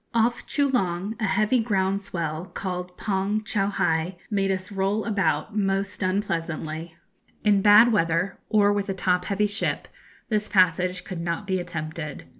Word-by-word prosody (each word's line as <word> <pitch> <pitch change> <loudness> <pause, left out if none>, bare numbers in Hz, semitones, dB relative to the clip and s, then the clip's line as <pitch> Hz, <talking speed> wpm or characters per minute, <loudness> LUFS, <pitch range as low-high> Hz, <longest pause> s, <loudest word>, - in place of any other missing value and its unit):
Off 230 +1 +1
Choolong 220 - 0
a 220 - 0
heavy 215 +6 +2
ground 200 -3 0
swell, 170 -4 -4
called 180 -1 -5
'Pon 200 +1 -1
choughai,' 190 -5 0
made 195 -1 +1
us 190 0 -2
roll 200 +2 0
about 200 -3 0
most 195 -1 -1
unpleasantly. 165 -4 -2 0.5
In 205 -2 +4
bad 210 +4 +7
weather, 170 -1 +1
or 205 -1 +4
with 205 0 -2
a 195 - -1
top 180 -1 +1
heavy 205 +1 +1
ship, 210 +3 -2 0.4
this 215 -2 -1
passage 180 -1 +2
could 180 -3 -6
not 170 +4 -3
be 190 -1 0
attempted. 155 -3 -5
195 Hz, 145 wpm, -25 LUFS, 175-205 Hz, 0.5 s, bad